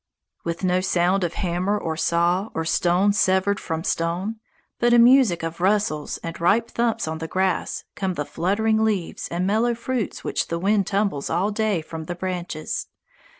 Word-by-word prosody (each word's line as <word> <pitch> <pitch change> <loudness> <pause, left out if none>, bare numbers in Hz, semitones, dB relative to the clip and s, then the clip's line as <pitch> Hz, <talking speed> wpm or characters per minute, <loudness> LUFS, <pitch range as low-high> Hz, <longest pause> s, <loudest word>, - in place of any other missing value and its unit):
With 170 +2 -4
no 185 0 +2
sound 185 +1 +2
of 175 -1 -2
hammer 185 +3 0
or 160 -5 -3
saw 175 +5 +1
or 160 - -1
stone 180 +4 +2
severed 200 0 +2
from 160 -1 -4
stone, 175 +7 -1 0.4
but 240 0 +4
a - - +6
music 235 -8 +5
of 165 +1 -5
rustles 190 -6 +1
and 165 0 -6
ripe 220 +7 +2
thumps 235 -7 0
on 160 0 -3
the 160 - -4
grass 185 +1 -1
come 190 -2 -2
the 145 - -2
fluttering 220 +7 +1
leaves 205 -6 -1
and 175 +2 -2
mellow 225 +4 +2
fruits 235 -1 -3
which - - -1
the 170 - -2
wind 200 +2 +1
tumbles 195 -8 -1
all 185 +6 +1
day 210 -5 0
from 160 0 -7
the 175 - -4
branches. 175 -3 -4
185 Hz, 175 wpm, -23 LUFS, 170-210 Hz, 0.4 s, a